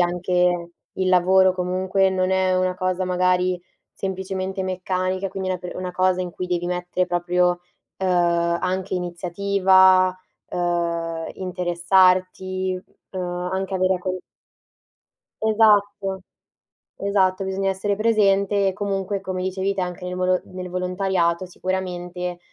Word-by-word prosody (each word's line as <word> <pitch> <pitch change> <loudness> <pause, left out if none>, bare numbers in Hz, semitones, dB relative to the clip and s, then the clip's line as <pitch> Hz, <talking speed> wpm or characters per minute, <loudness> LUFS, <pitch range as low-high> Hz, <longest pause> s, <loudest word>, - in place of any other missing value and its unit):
anche 175 0 +1 0.3
il 190 -1 0
lavoro, 185 +1 +5
comunque 185 +1 +1
non 185 0 0
è 190 -1 +2
una 185 0 +1
cosa 185 0 -1
magari 180 0 +1 0.3
semplicemente 190 0 -3
meccanica, 185 +1 -2
quindi 190 0 -4
una 185 - -1
pe 180 0 -6
cosa 185 0 +2
in 180 - -3
cui 180 +1 -5
devi 175 -1 -1
mettere 180 0 -1
proprio, 175 0 +1 0.4
uhm, 190 - -1 0.5
anche 185 +1 -2
iniziativa, 185 +1 +3 0.3
uhm, 170 -2 -1
interessarti, 185 +1 +1 0.3
uhm, 185 - -5 0.3
anche 190 0 -2
avere 185 0 +2
a 180 - -2
con 185 0 -3 1.3
Esatto, 205 -3 +3 0.8
esatto, 195 -1 +1
bisogna 195 0 -1
essere 195 +2 -1
presente 200 -2 +3
e - - 0
comunque, 195 0 -2
come 185 -1 -4
dicevi 190 +1 -1
te, 195 - -2
anche 180 0 -4
nel 180 0 -4
volo 185 0 +2
nel 185 0 -7
volontariato 180 -1 0
sicuramente 180 -1 -4
185 Hz, 125 wpm, -23 LUFS, 180-190 Hz, 1.3 s, lavoro